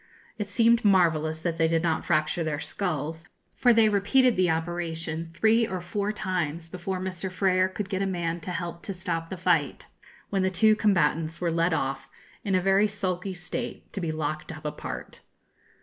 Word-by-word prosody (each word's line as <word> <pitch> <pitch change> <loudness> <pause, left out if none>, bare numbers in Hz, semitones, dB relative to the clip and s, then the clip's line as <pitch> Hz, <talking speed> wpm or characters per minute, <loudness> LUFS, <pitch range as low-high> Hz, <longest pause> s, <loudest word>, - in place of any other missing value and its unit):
It 205 -1 -3
seemed 230 +2 +4
marvellous 160 -5 +3
that 165 0 -2
they 165 - +4
did 165 0 +1
not 160 -2 0
fracture 155 +1 +1
their 155 -2 -2
skulls, 160 -3 -3 0.3
for 245 - +4
they 225 -1 +5
repeated 220 +5 +3
the 185 -2 +2
operation 165 0 -3
three 225 +3 +3
or 185 - -3
four 200 +4 -2
times 170 -5 -3
before 185 +2 -4
Mr. 185 0 -4
Frer 185 0 +2
could 185 +2 -5
get 195 -1 -2
a 195 - +1
man 175 -2 -2
to 170 - -7
help 170 -1 -4
to 195 - -3
stop 170 -3 -3
the 190 - -5
fight, 170 -6 +1 0.5
when 195 -2 +1
the 190 - +2
two 215 +4 +4
combatants 165 -5 +1
were 175 -2 0
led 165 +2 +2
off, 135 -3 -2 0.3
in 195 -3 0
a 185 - +3
very 195 +3 +4
sulky 190 -2 -3
state, 175 0 -6
to 195 - -4
be 165 -2 -1
locked 155 0 -3
up 155 -1 -10
apart. 150 - -6
175 Hz, 185 wpm, -27 LUFS, 165-195 Hz, 0.5 s, they